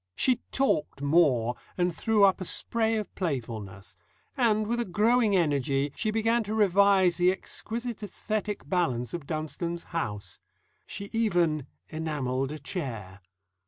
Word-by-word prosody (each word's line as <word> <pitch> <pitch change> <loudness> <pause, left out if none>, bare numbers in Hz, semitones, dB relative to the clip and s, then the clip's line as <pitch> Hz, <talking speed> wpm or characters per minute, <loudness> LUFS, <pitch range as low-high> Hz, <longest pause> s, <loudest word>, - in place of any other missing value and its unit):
She 255 -2 +3
talked 150 - 0
more, 140 -6 +3 0.2
and 175 -1 +1
threw 220 +2 +2
up 195 0 +4
a - - -1
spray 225 +4 0
of 215 -4 -4
playfulness. 110 - -5 0.4
And, 220 -5 +2
with 235 +3 -1
a - - +2
growing 215 +2 +3
energy, 145 -4 +1
she 220 - -1
began 225 +2 +2
to 215 +2 -3
revise 200 -3 +4
the 180 +1 +4
exquisite 230 +4 -4
æsthetic 210 0 -4
balance 130 -10 0
of 165 -5 -5
Dunstone's 170 +2 -3
house. 105 -11 -4 0.5
She 200 0 -7
even 175 - +1 0.2
enamelled 140 -4 -2
a 155 - -5
chair. 120 - -6
175 Hz, 135 wpm, -28 LUFS, 140-215 Hz, 0.5 s, up